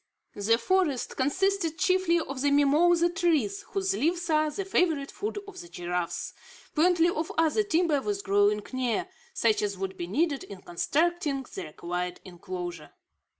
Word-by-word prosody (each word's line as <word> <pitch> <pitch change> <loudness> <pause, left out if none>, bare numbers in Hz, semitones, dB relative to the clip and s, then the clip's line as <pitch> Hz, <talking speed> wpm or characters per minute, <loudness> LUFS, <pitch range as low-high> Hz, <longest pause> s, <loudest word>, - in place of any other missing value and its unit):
The 220 +3 +2
forest 295 +1 0
consisted 330 +4 0
chiefly 370 -2 +2
of 275 -4 -5
mimosa 295 +5 +4
trees, 325 - +1
whose 390 -1 0
leaves 345 0 0
are 310 0 +3
the 380 +6 -4
favourite 325 -7 +1
food 420 0 -4
of 395 -2 -10
the 345 - -11
giraffe. 175 - -3 0.4
Plenty 340 +1 +4
of 325 -2 -2
other 325 +6 +3
timber 335 -7 +1
was 205 -3 -2
growing 205 +1 +2
near, 255 +8 -1 0.3
such 225 -2 +2
as 200 -2 -2
would 190 0 -4
be 175 - -4
needed 285 - 0
in 195 -2 -11
constructing 290 - 0
the - - -5
required 175 +3 -4
inclosure. 175 -3 -7
290 Hz, 150 wpm, -28 LUFS, -, 0.4 s, mimosa